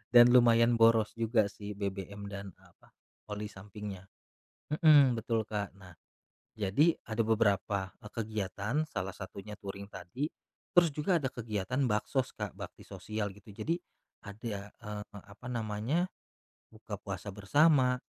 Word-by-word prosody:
dan 120 Hz, 0 st, +10 dB
lumayan 115 Hz, -1 st, +6 dB
boros 115 Hz, -1 st, +5 dB
juga 115 Hz, -2 st, +2 dB
sih 105 Hz, 0 st, -7 dB
BBM 100 Hz, 0 st, -4 dB
dan 100 Hz, -2 st, -7 dB
apa -, -, -23 dB, 0.5 s
oli 105 Hz, 0 st, -5 dB
sampingnya, 100 Hz, -1 st, -8 dB, 0.7 s
mhm, 145 Hz, -6 st, +7 dB
betul, 115 Hz, -1 st, -1 dB
Kak, 105 Hz, -2 st, -2 dB
nah, 90 Hz, -3 st, -13 dB, 0.6 s
jadi 125 Hz, -, +3 dB
ada 115 Hz, 0 st, 0 dB
beberapa, 100 Hz, -3 st, +1 dB
eee, 105 Hz, -, -9 dB
kegiatan 110 Hz, +4 st, -2 dB
salah 95 Hz, -1 st, -3 dB
satunya 100 Hz, +2 st, -8 dB
touring 100 Hz, -1 st, -7 dB
tadi, 95 Hz, +8 st, -4 dB, 0.5 s
terus 175 Hz, -2 st, +6 dB
juga 155 Hz, +3 st, +1 dB
ada 130 Hz, -, 0 dB
kegiatan 115 Hz, +3 st, -1 dB
baksos, 125 Hz, +4 st, 0 dB
Kak, -, -, -4 dB
bakti -, -, -8 dB
sosial 105 Hz, -1 st, -4 dB
gitu 100 Hz, +1 st, -14 dB
jadi, 165 Hz, +9 st, -1 dB, 0.5 s
ada, 100 Hz, -1 st, -6 dB
eee, 105 Hz, -2 st, -6 dB, 0.2 s
apa 100 Hz, +4 st, -14 dB
namanya 120 Hz, -, -1 dB, 0.6 s
buka -, -, -8 dB
puasa 100 Hz, -, -5 dB
bersama, 130 Hz, -, +4 dB
105 Hz, 135 wpm, -32 LUFS, 100-120 Hz, 0.7 s, dan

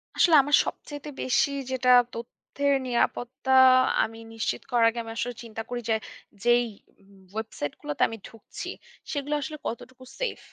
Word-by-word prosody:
আসলে 335 Hz, -3 st, +5 dB
আমার 290 Hz, +2 st, +4 dB
সবচাইতে 290 Hz, 0 st, -7 dB
বেশি 270 Hz, +2 st, +2 dB, 0.2 s
যেটা 255 Hz, -1 st, +1 dB, 0.2 s
তথ্যের 280 Hz, +4 st, -2 dB
নিরাপত্তা 250 Hz, +2 st, 0 dB, 0.5 s
আমি 225 Hz, +1 st, -5 dB
নিশ্চিত 225 Hz, 0 st, -2 dB
করার 235 Hz, -2 st, +5 dB
আগে 235 Hz, +1 st, -5 dB
আমি 225 Hz, -, -8 dB
আসলে 245 Hz, 0 st, -2 dB
চিন্তা 225 Hz, -1 st, -6 dB
করি 245 Hz, 0 st, -3 dB
যে 220 Hz, -, +4 dB, 0.5 s
যেই 240 Hz, 0 st, +4 dB, 0.4 s
উম 195 Hz, 0 st, -21 dB
ওয়েবসাইটে 220 Hz, -9 st, -4 dB
গুলাতে 295 Hz, -2 st, -5 dB
আমি 225 Hz, -, -6 dB
ঢুকছি, 225 Hz, -2 st, -9 dB, 0.4 s
সেগুলা 290 Hz, 0 st, -1 dB
আসলে 305 Hz, +2 st, -5 dB
কতটুকু 250 Hz, +2 st, -7 dB, 0.2 s
সেইফ। -, -, -2 dB
245 Hz, 150 wpm, -26 LUFS, 230-280 Hz, 0.5 s, আসলে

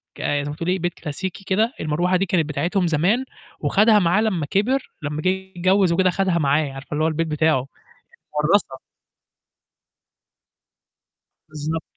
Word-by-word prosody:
ك -, -, -9 dB
زي 145 Hz, 0 st, 0 dB
ما 145 Hz, -, -5 dB
تقولي 180 Hz, +3 st, -1 dB
بيت 175 Hz, 0 st, -2 dB
كلاسيكي 180 Hz, +5 st, -6 dB
كده، 215 Hz, +6 st, +1 dB
المروحة 175 Hz, +4 st, 0 dB
دي 195 Hz, -, 0 dB
كانت 170 Hz, -3 st, +1 dB
بتاعتهم 175 Hz, +4 st, 0 dB
زمان 180 Hz, -, +1 dB, 0.3 s
وخَدها 210 Hz, +8 st, +4 dB
معاه 180 Hz, +2 st, +2 dB
لمّا 190 Hz, -9 st, 0 dB
كبر 220 Hz, -, 0 dB
لمّا 150 Hz, 0 st, -3 dB
جِه 185 Hz, -, +2 dB
يتجوّز 190 Hz, 0 st, +1 dB
وكده 185 Hz, +2 st, +3 dB
خَدها 185 Hz, -1 st, +1 dB
معاه، 145 Hz, -1 st, +1 dB
عارفة 135 Hz, +1 st, -10 dB
اللي 150 Hz, +1 st, 0 dB
هو -, -, +3 dB
البيت 165 Hz, +1 st, -1 dB
بتاعه، 155 Hz, -4 st, +1 dB, 0.7 s
متورّثة. 150 Hz, -4 st, +1 dB, 2.7 s
بالضبط. 155 Hz, +1 st, -4 dB
175 Hz, 145 wpm, -22 LUFS, 155-190 Hz, 2.7 s, وخَدها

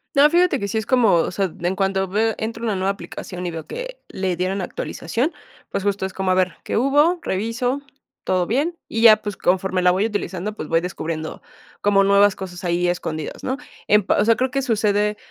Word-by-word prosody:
No, 280 Hz, +1 st, +7 dB
fíjate 345 Hz, -4 st, +3 dB
que 200 Hz, -, -2 dB
sí 210 Hz, -, -2 dB
es 220 Hz, -, -1 dB
como, 245 Hz, -5 st, +4 dB
o 165 Hz, -, +1 dB
sea, 190 Hz, -2 st, -1 dB
en 175 Hz, +2 st, -1 dB
cuanto 195 Hz, 0 st, +1 dB
a 190 Hz, -, -1 dB
veo 220 Hz, +4 st, +1 dB
entro 225 Hz, +1 st, -4 dB
a -, -, 0 dB
una 215 Hz, -3 st, 0 dB
nueva 190 Hz, +1 st, 0 dB
aplicación 180 Hz, -2 st, -6 dB
y 175 Hz, -, -2 dB
veo 165 Hz, -1 st, -7 dB
que -, -, -6 dB
le 185 Hz, -2 st, -2 dB
dieron 185 Hz, +2 st, -1 dB
actualización, 230 Hz, -, -2 dB, 0.4 s
pues, 200 Hz, -, -3 dB
justo 200 Hz, -1 st, 0 dB
es 190 Hz, -, -5 dB
como 190 Hz, -1 st, 0 dB
a -, -, +4 dB
ver 185 Hz, -1 st, +1 dB
qué -, -, -2 dB
hubo, 290 Hz, +8 st, +3 dB
reviso, 235 Hz, +7 st, -1 dB, 0.4 s
todo 185 Hz, -1 st, +1 dB
bien, 300 Hz, +9 st, 0 dB
y 225 Hz, -, -2 dB
ya, 220 Hz, -2 st, +8 dB
pues, 205 Hz, -2 st, -5 dB
conforme 185 Hz, 0 st, +1 dB
la 180 Hz, 0 st, +5 dB
voy 190 Hz, +4 st, +1 dB
utilizando, 205 Hz, -2 st, -3 dB
pues, 155 Hz, -, -6 dB
voy 165 Hz, 0 st, +3 dB
descubriendo 160 Hz, -3 st, -5 dB, 0.4 s
como 200 Hz, -1 st, +4 dB
nuevas 200 Hz, 0 st, +5 dB
cosas, 180 Hz, -2 st, -8 dB
ahí 175 Hz, 0 st, +1 dB
escondidas, 160 Hz, -3 st, -3 dB
¿no? 260 Hz, +1 st, -1 dB, 0.3 s
En, 210 Hz, 0 st, +5 dB
pa -, -, +1 dB
o 205 Hz, -, +3 dB
sea 230 Hz, 0 st, +5 dB
creo 260 Hz, 0 st, 0 dB
que 275 Hz, +1 st, 0 dB
sucede, 210 Hz, -3 st, +1 dB
200 Hz, 225 wpm, -21 LUFS, 185-230 Hz, 0.4 s, ya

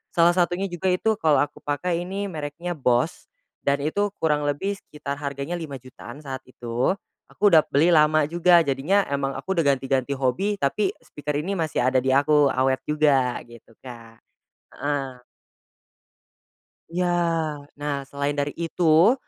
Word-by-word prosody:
Salah 170 Hz, 0 st, +6 dB
satunya 180 Hz, +2 st, +1 dB
juga 175 Hz, +2 st, -3 dB
itu 220 Hz, +2 st, 0 dB
kalau 155 Hz, -5 st, +4 dB
aku -, -, -7 dB
pakai 170 Hz, +4 st, -2 dB
ini, 200 Hz, +1 st, -3 dB
mereknya 155 Hz, +3 st, -5 dB
Bose 130 Hz, 0 st, 0 dB, 0.4 s
dan 140 Hz, 0 st, +1 dB
itu 205 Hz, +6 st, -1 dB
kurang 150 Hz, -2 st, 0 dB
lebih 195 Hz, +8 st, -2 dB
sekitar 140 Hz, -1 st, -7 dB
harganya 140 Hz, +4 st, -4 dB
Rp5.000.000-an 135 Hz, -2 st, -9 dB
saat 135 Hz, -2 st, -5 dB
itu. 125 Hz, +7 st, -1 dB, 0.4 s
Aku 210 Hz, -, +2 dB
udap 160 Hz, -6 st, +5 dB
beli 150 Hz, +5 st, +4 dB
lama 150 Hz, -1 st, +4 dB
juga, 175 Hz, +2 st, +5 dB
jadinya 160 Hz, +7 st, +1 dB
emang 140 Hz, -1 st, -1 dB
aku 190 Hz, -, -3 dB
udah 165 Hz, -, +3 dB
ganti-ganti 135 Hz, 0 st, -1 dB
hobi, 140 Hz, +11 st, -1 dB
tapi 190 Hz, +8 st, +1 dB
e -, -, -34 dB
speaker 145 Hz, 0 st, -4 dB
ini 195 Hz, +5 st, -3 dB
masih 160 Hz, -3 st, -1 dB
ada 130 Hz, +1 st, +2 dB
di 130 Hz, -, +1 dB
aku, 145 Hz, 0 st, +4 dB
awet 130 Hz, 0 st, +1 dB
juga 140 Hz, -5 st, +2 dB
gitu 120 Hz, -1 st, -15 dB
Kak. 115 Hz, -3 st, -12 dB, 0.6 s
Heeh. 135 Hz, -4 st, -3 dB, 1.7 s
Iya. 180 Hz, +2 st, -1 dB, 0.7 s
Nah, 145 Hz, 0 st, -2 dB, 0.2 s
selain 140 Hz, +1 st, -2 dB
dari 145 Hz, 0 st, -2 dB
itu, 170 Hz, +4 st, +4 dB
145 Hz, 150 wpm, -24 LUFS, 135-175 Hz, 1.7 s, Salah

